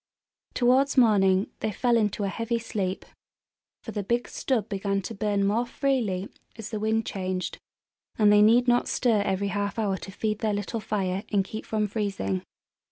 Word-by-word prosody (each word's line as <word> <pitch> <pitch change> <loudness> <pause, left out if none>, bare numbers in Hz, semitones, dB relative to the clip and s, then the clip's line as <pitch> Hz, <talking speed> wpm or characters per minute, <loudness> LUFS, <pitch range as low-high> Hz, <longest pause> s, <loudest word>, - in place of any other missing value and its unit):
Towards 260 +3 +3
morning 200 -5 +4
they 215 - -1
fell 240 +3 +1
into 210 -2 +1
a - - 0
heavy 230 +4 -2
sleep; 200 -4 -3 0.8
for 225 - -6
the 210 - -3
big 235 +5 -1
stub 230 -6 -1
began 195 -1 -2
to - - -5
burn 200 0 0
more 215 +4 +2
freely 230 -10 -1 0.3
as 225 -2 -7
the 215 - -3
wind 220 +1 0
changed, 185 -1 -3 0.6
and 210 -1 +5
they 210 - +6
need 235 +4 +5
not 245 0 +3
stir 230 -5 +2
every 200 0 -1
half 200 +1 -2
hour 200 -4 0
to 195 - -9
feed 215 +1 -2
their 215 -2 0
little 205 +3 -3
fire 195 -2 -2
and 200 -2 +2
keep 215 +2 -7
from 215 -1 0
freezing. 195 - -2
210 Hz, 175 wpm, -26 LUFS, 195-225 Hz, 0.8 s, they